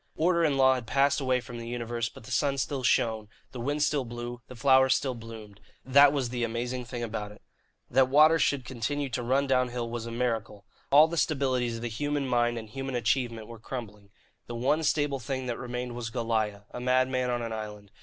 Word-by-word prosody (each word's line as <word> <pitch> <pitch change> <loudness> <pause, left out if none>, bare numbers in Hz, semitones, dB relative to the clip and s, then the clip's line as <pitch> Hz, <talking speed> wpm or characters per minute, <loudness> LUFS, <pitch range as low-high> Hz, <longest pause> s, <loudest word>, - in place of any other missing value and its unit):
Order 170 +1 +2
and 145 -4 +2
law 130 -1 +6
had 125 -3 -4
passed 140 +4 +2
away 130 -1 +2
from 120 0 -8
the 115 - -7
universe; 120 -1 -3
but - - -14
the 130 - -11
sun 140 +3 +1
still 135 0 -2
shone, 110 -3 +1 0.2
the 125 - -8
wind 145 +5 0
still 145 -2 +1
blew, 120 0 -7
the 125 - -10
flowers 130 +1 +5
still 130 -1 -1
bloomed 110 -3 -10 0.3
that 140 +2 +7
was 135 -4 -1
the 120 0 -2
amazing 120 +2 -3
thing 120 0 -5
about 105 -2 -4
it. 105 - -16 0.4
That 130 +1 +3
water 155 +4 +6
should 140 -5 +1
continue 130 +5 -3
to 125 - -3
run 130 +4 +1
downhill 125 -3 0
was 115 -1 -4
a - - -5
miracle. 115 -4 -2 0.2
All 150 +3 +7
the 170 +1 -5
stabilities 130 -6 0
of 115 - -7
the - - -1
human 145 +4 -2
mind 120 -1 +1
and 110 -1 -6
human 135 +3 -5
achievement 115 -1 0
were 115 0 -11
crumbling. 105 -4 -8 0.4
The 120 - -6
one 135 +7 +1
stable 145 -3 +1
thing 130 +1 -4
that 120 -2 -3
remained 125 0 -4
was 120 -1 -5
Goliah, 110 -3 -1
a - - -6
madman 130 0 +1
on 120 -1 -1
an 115 -1 -4
island. 105 -2 -7
125 Hz, 215 wpm, -28 LUFS, 115-135 Hz, 0.4 s, that